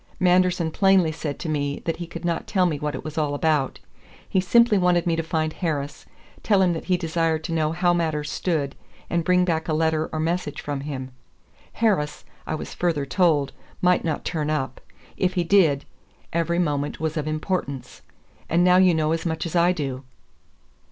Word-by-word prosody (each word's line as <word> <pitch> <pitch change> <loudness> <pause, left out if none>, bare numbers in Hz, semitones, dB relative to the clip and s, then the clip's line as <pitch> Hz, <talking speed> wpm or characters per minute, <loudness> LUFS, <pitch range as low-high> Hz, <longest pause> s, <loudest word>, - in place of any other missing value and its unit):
Manderson 180 -2 +3
plainly 190 -3 +4
said 150 -2 -4
to - - -6
me 145 -2 -2
that 165 - -1
he 175 - -6
could 170 0 -7
not 170 -1 -1
tell 190 -4 +2
me 155 -5 0
what 150 -1 -2
it - - -6
was 155 0 -4
all 145 -2 0
about. 150 -3 +1 0.5
He 190 - +1
simply 220 +3 +4
wanted 180 -1 +2
me 170 -2 +1
to 165 - 0
find 160 -1 -1
Harris, 145 -5 -3 0.3
tell 200 -3 +3
him 180 -2 +3
that 165 - -5
he 180 -1 +2
desired 165 -2 0
to 160 - -4
know 155 -1 +1
how 175 +1 +2
matters 155 -3 -1
stood, 150 -6 -1 0.4
and 170 -1 +1
bring 180 +1 +3
back 160 -2 -1
a 160 - 0
letter 160 0 +1
or 155 - -3
message 160 -2 -2
from 145 -1 -4
him. 130 -3 -5 0.6
Harris, 185 -10 0 0.2
I - - -1
was - - -7
further 165 -5 0
told, 145 0 +2 0.3
might 180 0 +3
not 160 -3 -2
turn 155 -3 -2
up. 150 -4 -2 0.4
If 185 0 0
he 175 - +2
did, 165 -7 +3 0.5
'every 170 +1 0
moment 145 -4 -1
was 155 0 -2
of 155 -1 -2
importance.' 155 -3 -3 0.5
And 170 +2 +3
now 180 0 +5
you 185 -2 +5
know 155 -1 +1
as 165 0 -1
much 160 -2 -2
as 170 - -5
I 175 +1 +4
do." 135 -6 -4
160 Hz, 195 wpm, -24 LUFS, 150-180 Hz, 0.6 s, now